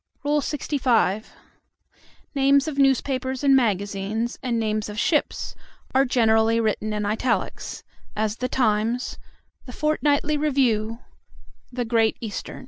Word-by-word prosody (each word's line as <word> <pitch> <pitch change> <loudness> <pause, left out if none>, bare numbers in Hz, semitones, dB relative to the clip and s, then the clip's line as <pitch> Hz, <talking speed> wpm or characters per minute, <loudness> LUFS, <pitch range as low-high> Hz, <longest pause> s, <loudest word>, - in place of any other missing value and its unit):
LXV. 270 -7 +1 1.1
Names 275 0 +3
of 285 -2 -3
newspapers 265 -1 +1
and 275 -1 +5
magazines, 205 0 -1
and 245 -3 -1
names 215 -1 -1
of 210 - -7
ships, 300 +2 0 0.4
are 270 +1 +4
generally 225 -2 +3
written 215 -1 -1
in 210 -1 -2
italics; 225 +4 -2 0.3
as 215 +1 -1
the 255 +1 -2
Times, 230 0 0 0.5
the - - -7
Fort 305 +3 0
nightly 295 +1 +2
Review, 245 -7 +1 0.7
the 245 -1 -2
Great 225 -1 +2
Eastern. 220 -3 -6
240 Hz, 120 wpm, -24 LUFS, 215-275 Hz, 1.1 s, and